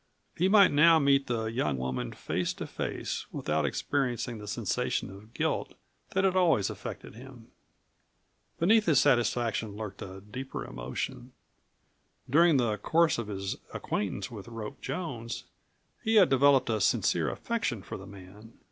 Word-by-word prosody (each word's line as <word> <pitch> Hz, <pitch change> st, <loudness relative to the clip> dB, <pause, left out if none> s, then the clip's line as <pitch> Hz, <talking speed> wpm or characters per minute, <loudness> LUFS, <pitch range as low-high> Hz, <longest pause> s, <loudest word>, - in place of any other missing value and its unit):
He 185 Hz, +3 st, +2 dB
might 200 Hz, -2 st, +7 dB
now 160 Hz, +3 st, +6 dB
meet 140 Hz, -2 st, +3 dB
the 115 Hz, -2 st, -1 dB
young 115 Hz, -, -1 dB
woman 65 Hz, -1 st, -3 dB
face -, -, -2 dB
to -, -, -6 dB
face, -, -, -4 dB
without -, -, -1 dB
experiencing 125 Hz, -4 st, -2 dB
the 105 Hz, -, -9 dB
sensation 100 Hz, -, -2 dB
of 100 Hz, +3 st, -13 dB
guilt -, -, -1 dB, 0.4 s
that 190 Hz, -, +3 dB
had 190 Hz, -1 st, +2 dB
always 165 Hz, -, +3 dB
affected -, -, -8 dB
him. 120 Hz, 0 st, -13 dB, 1.1 s
Beneath 210 Hz, +5 st, +4 dB
his 150 Hz, -5 st, +5 dB
satisfaction 115 Hz, -3 st, +1 dB
lurked 105 Hz, -2 st, -7 dB
a 95 Hz, 0 st, -8 dB
deeper 125 Hz, +6 st, -6 dB
emotion. -, -, -5 dB, 0.9 s
During 160 Hz, +3 st, +5 dB
the 115 Hz, -4 st, +1 dB
course 165 Hz, +5 st, +2 dB
of 115 Hz, -, -4 dB
his 95 Hz, -2 st, -4 dB, 0.2 s
acquaintance 100 Hz, +1 st, -3 dB
with 105 Hz, -2 st, -9 dB
Rope 115 Hz, -2 st, -7 dB
Jones 130 Hz, -6 st, -4 dB, 0.6 s
he 225 Hz, +1 st, +1 dB
had 200 Hz, -5 st, +7 dB
developed 135 Hz, -2 st, +4 dB
a 110 Hz, -2 st, 0 dB
sincere -, -, +2 dB
affection 205 Hz, -, -2 dB
for -, -, -7 dB
the 95 Hz, -, -11 dB
man. 100 Hz, +3 st, -13 dB
120 Hz, 150 wpm, -29 LUFS, 105-150 Hz, 1.1 s, might